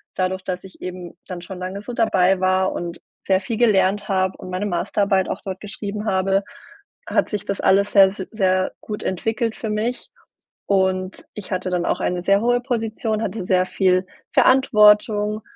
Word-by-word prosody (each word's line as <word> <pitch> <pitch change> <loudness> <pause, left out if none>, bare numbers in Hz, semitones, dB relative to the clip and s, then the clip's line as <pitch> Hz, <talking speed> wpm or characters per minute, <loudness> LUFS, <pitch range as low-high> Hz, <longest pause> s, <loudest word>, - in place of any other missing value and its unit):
Dadurch, 185 0 -1
dass 180 -1 -4
ich 190 -1 -14
eben 180 -1 -7
dann 180 -2 -6
schon 185 +1 -8
lange 190 +2 -5
so 245 - -7
dabei 190 -5 +2
war 185 0 +2
und 170 0 -6 0.3
sehr 190 -1 +3
viel 230 +2 -4
gelernt 205 -3 +2
habe 190 -1 0
und 185 - -9
meine 185 +3 -2
Masterarbeit 195 +1 0
auch - - -4
dort 190 -1 -5
geschrieben 210 0 -5
habe, 195 0 +1 0.6
hat - - +1
sich 210 -2 -3
das 200 - -3
alles 200 +2 +3
sehr, 195 -2 +8
s 190 - -6
sehr 185 -3 +1
gut 210 -1 -6
entwickelt 225 +4 -1
für 220 - -5
mich 220 +4 -2 0.6
und 190 -1 0
ich 205 -1 -9
hatte 185 0 -2
dann 180 -1 -1
auch - - 0
eine 180 0 -1
sehr 195 +1 +3
hohe 245 +1 +2
Position, 225 -3 -2
hatte 190 -2 -4
sehr 185 0 +2
viel 185 0 +1 0.3
Verantwortung 210 -4 +4
195 Hz, 175 wpm, -21 LUFS, 185-210 Hz, 0.6 s, sehr